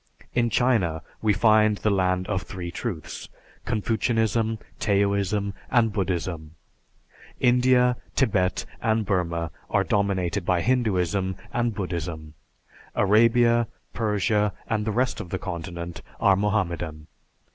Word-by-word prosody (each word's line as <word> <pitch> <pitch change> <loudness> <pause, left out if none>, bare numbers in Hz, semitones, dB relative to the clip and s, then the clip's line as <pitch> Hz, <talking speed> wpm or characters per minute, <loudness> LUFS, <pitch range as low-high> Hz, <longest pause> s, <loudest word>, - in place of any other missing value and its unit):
In 120 -1 +2
China, 105 -10 +1 0.2
we 110 - +3
find 110 0 +4
the 105 - +1
land 95 -1 +1
of 95 -2 -1
three 90 -3 -6
truths, 90 - -5 0.4
Confucianism, 115 0 0 0.2
Taoism, 100 0 +1 0.2
and 115 -4 +3
Buddhism. 85 -5 -3 0.8
India, 125 0 +4 0.2
Tibet, 100 -8 +1 0.2
and 110 -1 +1
Burma 85 -4 -1 0.2
are - - +2
dominated 95 -4 0
by 90 0 +1
Hinduism 95 -6 +1 0.2
and 120 -2 0
Buddhism; 85 -5 -4 0.6
Arabia, 115 +3 +4 0.3
Persia, 105 -2 +1
and 105 -1 -1
the 110 - 0
rest 125 +4 0
of 90 - -9
the 95 - -2
continent 85 -2 -6 0.2
are 100 -1 +5
Mohammedan. 85 -7 -1
100 Hz, 115 wpm, -25 LUFS, 90-115 Hz, 0.8 s, are